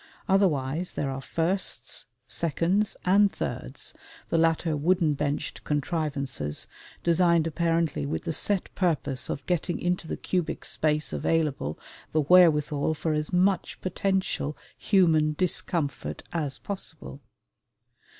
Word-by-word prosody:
Otherwise 175 Hz, -4 st, +2 dB
there 140 Hz, -2 st, -2 dB
are 135 Hz, 0 st, -4 dB
firsts, 165 Hz, -4 st, -2 dB, 0.2 s
seconds, 170 Hz, +6 st, +1 dB
and 200 Hz, +2 st, +5 dB
thirds, -, -, -5 dB, 0.4 s
the -, -, +2 dB
latter 165 Hz, -1 st, +2 dB
wooden 165 Hz, +1 st, +2 dB
benched 145 Hz, 0 st, -3 dB
contrivances, 140 Hz, -, -2 dB, 0.4 s
designed 170 Hz, -1 st, +4 dB
apparently 165 Hz, -1 st, 0 dB
with 140 Hz, -, -2 dB
the 165 Hz, -, -2 dB
set 200 Hz, +3 st, 0 dB
purpose 150 Hz, -7 st, 0 dB
of 135 Hz, -, -4 dB
getting 175 Hz, -1 st, -1 dB
into 175 Hz, -1 st, -1 dB
the -, -, -3 dB
cubic 180 Hz, -3 st, -2 dB
space 155 Hz, -1 st, 0 dB
available 150 Hz, -, 0 dB, 0.4 s
the 155 Hz, -, +3 dB
wherewithal 150 Hz, -2 st, +4 dB
for 155 Hz, +1 st, -1 dB
as 150 Hz, 0 st, -2 dB
much 185 Hz, +1 st, +1 dB
potential 185 Hz, -5 st, -1 dB, 0.2 s
human 160 Hz, -6 st, +3 dB
discomfort 160 Hz, -3 st, -1 dB
as 150 Hz, -5 st, -2 dB
possible. 160 Hz, -7 st, -7 dB
165 Hz, 115 wpm, -27 LUFS, 150-180 Hz, 0.4 s, and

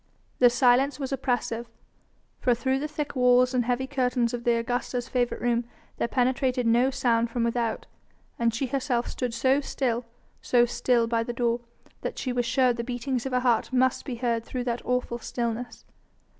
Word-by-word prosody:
The 245 Hz, -, +7 dB
silence 255 Hz, +3 st, +3 dB
was 270 Hz, -1 st, -4 dB
oppressive, 245 Hz, -3 st, -2 dB, 0.7 s
for 245 Hz, -, +2 dB
through 265 Hz, +2 st, 0 dB
the 300 Hz, -, -2 dB
thick 300 Hz, -1 st, -4 dB
walls 250 Hz, 0 st, +4 dB
and 245 Hz, -2 st, +1 dB
heavy 250 Hz, +1 st, 0 dB
curtains 250 Hz, -3 st, 0 dB
of 235 Hz, -1 st, -4 dB
the 240 Hz, -, +4 dB
Augusta's 245 Hz, +1 st, -2 dB
favourite 245 Hz, -1 st, -1 dB
room 240 Hz, 0 st, +1 dB, 0.3 s
there -, -, 0 dB
penetrated 255 Hz, 0 st, +1 dB
no 240 Hz, +3 st, +4 dB
sound 235 Hz, -3 st, +1 dB
from 235 Hz, 0 st, -1 dB
without, 235 Hz, -1 st, -1 dB, 0.5 s
and 235 Hz, -1 st, +2 dB
she 230 Hz, +4 st, -2 dB
herself 255 Hz, -2 st, -1 dB
stood 250 Hz, -2 st, -3 dB
so 260 Hz, +4 st, +2 dB
still, 245 Hz, -4 st, -2 dB, 0.4 s
so 240 Hz, -1 st, +4 dB
still 240 Hz, 0 st, +1 dB
by 230 Hz, 0 st, 0 dB
the 240 Hz, +1 st, -3 dB
door, 235 Hz, 0 st, 0 dB, 0.4 s
that -, -, -4 dB
she 255 Hz, -, -2 dB
was 245 Hz, -1 st, 0 dB
sure 250 Hz, 0 st, +3 dB
the 235 Hz, 0 st, -4 dB
beatings 250 Hz, +1 st, -2 dB
of -, -, -5 dB
her 250 Hz, 0 st, +1 dB
heart 240 Hz, -2 st, +1 dB
must 260 Hz, 0 st, +2 dB
be 255 Hz, -, -5 dB
heard 235 Hz, -1 st, -1 dB
through 250 Hz, +1 st, -4 dB
that 240 Hz, -1 st, -2 dB
awful 250 Hz, -1 st, -1 dB
stillness. 235 Hz, +1 st, -4 dB
245 Hz, 185 wpm, -26 LUFS, 235-255 Hz, 0.7 s, The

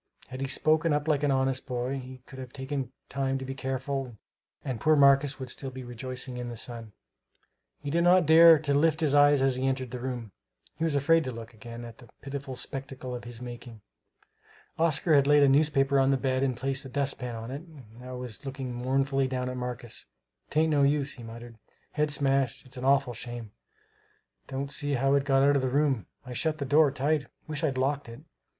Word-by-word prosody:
Had 130 Hz, +1 st, -7 dB
he 135 Hz, -, -1 dB
spoken 155 Hz, +3 st, +2 dB
up 150 Hz, +1 st, -1 dB
like 150 Hz, -3 st, +2 dB
an 145 Hz, -, +1 dB
honest 130 Hz, -1 st, 0 dB
boy 125 Hz, +2 st, -2 dB
he 130 Hz, 0 st, -10 dB
could 130 Hz, -, -11 dB
have 130 Hz, -1 st, -8 dB
taken 135 Hz, -1 st, -4 dB, 0.2 s
time 135 Hz, -1 st, -1 dB
to 130 Hz, -, -6 dB
be 135 Hz, -, -4 dB
careful 135 Hz, -2 st, -3 dB, 0.5 s
and 130 Hz, -5 st, -3 dB
poor 155 Hz, 0 st, +4 dB
Marcus 140 Hz, -1 st, +5 dB
would 130 Hz, -2 st, -4 dB
still 135 Hz, -, -3 dB
be 130 Hz, 0 st, -8 dB
rejoicing 125 Hz, +1 st, -5 dB
in 125 Hz, 0 st, -4 dB
the 120 Hz, -, -7 dB
sun. 115 Hz, -2 st, -5 dB, 0.9 s
He 145 Hz, -1 st, -4 dB
did 170 Hz, +2 st, +2 dB
not 180 Hz, 0 st, +5 dB
dare 165 Hz, +1 st, +8 dB
to 145 Hz, -1 st, -1 dB
lift 155 Hz, +2 st, +2 dB
his 150 Hz, -3 st, +2 dB
eyes 145 Hz, -1 st, +5 dB
as 135 Hz, -2 st, +2 dB
he 130 Hz, +1 st, 0 dB
entered 130 Hz, -2 st, -2 dB
the 125 Hz, -, -5 dB
room; 120 Hz, -4 st, -5 dB, 0.4 s
he 160 Hz, -, -5 dB
was 160 Hz, -3 st, +1 dB
afraid 160 Hz, +4 st, +4 dB
to 130 Hz, -, -3 dB
look 115 Hz, 0 st, -9 dB
again 115 Hz, +1 st, -9 dB
on 115 Hz, -, -9 dB
that 120 Hz, -3 st, -17 dB
pitiful 140 Hz, -1 st, -6 dB
spectacle 135 Hz, -1 st, -5 dB
of 120 Hz, -1 st, -6 dB
his 120 Hz, 0 st, -9 dB
making. 120 Hz, -2 st, -9 dB, 1.0 s
Oscar 165 Hz, 0 st, +2 dB
had 140 Hz, -1 st, +5 dB
laid 145 Hz, 0 st, +6 dB
a -, -, +6 dB
newspaper 140 Hz, -1 st, +3 dB
on 135 Hz, 0 st, +3 dB
the 135 Hz, -, +3 dB
bed 130 Hz, -1 st, 0 dB
and 130 Hz, -3 st, 0 dB
placed 135 Hz, +1 st, -2 dB
the 135 Hz, -, -9 dB
dustpan 135 Hz, -3 st, -3 dB
on 115 Hz, +2 st, -6 dB
it 140 Hz, +2 st, -5 dB
and 135 Hz, -10 st, -15 dB
now 125 Hz, 0 st, -8 dB
was 125 Hz, +1 st, -7 dB
looking 135 Hz, -2 st, -5 dB
mournfully 135 Hz, +2 st, 0 dB
down 125 Hz, -1 st, -2 dB
at 125 Hz, -, -4 dB
Marcus. 125 Hz, -2 st, -5 dB, 0.4 s
"'Tain't 155 Hz, +1 st, +2 dB
no 145 Hz, -1 st, +3 dB
use," 140 Hz, 0 st, +2 dB
he 125 Hz, -, -12 dB
muttered, 115 Hz, 0 st, -10 dB, 0.3 s
"head's 150 Hz, -1 st, 0 dB
smashed. 135 Hz, -2 st, 0 dB
It's 130 Hz, -, -11 dB
an 125 Hz, 0 st, -5 dB
awful 135 Hz, -2 st, +3 dB
shame! 120 Hz, -2 st, -7 dB, 1.0 s
Don't 140 Hz, +1 st, -4 dB
see 145 Hz, -1 st, -1 dB
how 135 Hz, +1 st, +2 dB
it 140 Hz, -1 st, +2 dB
got 135 Hz, -1 st, +3 dB
out 145 Hz, +1 st, +5 dB
of -, -, 0 dB
the 130 Hz, -, 0 dB
room 135 Hz, -, +1 dB, 0.2 s
I 125 Hz, -, -7 dB
shut 155 Hz, +4 st, -1 dB
the 140 Hz, -, -3 dB
door 150 Hz, +2 st, +5 dB
tight. 145 Hz, +2 st, 0 dB, 0.2 s
Wish 155 Hz, +1 st, -4 dB
I'd 135 Hz, -4 st, 0 dB
locked 135 Hz, 0 st, -1 dB
it! 115 Hz, -, -10 dB
135 Hz, 215 wpm, -28 LUFS, 125-145 Hz, 1.0 s, dare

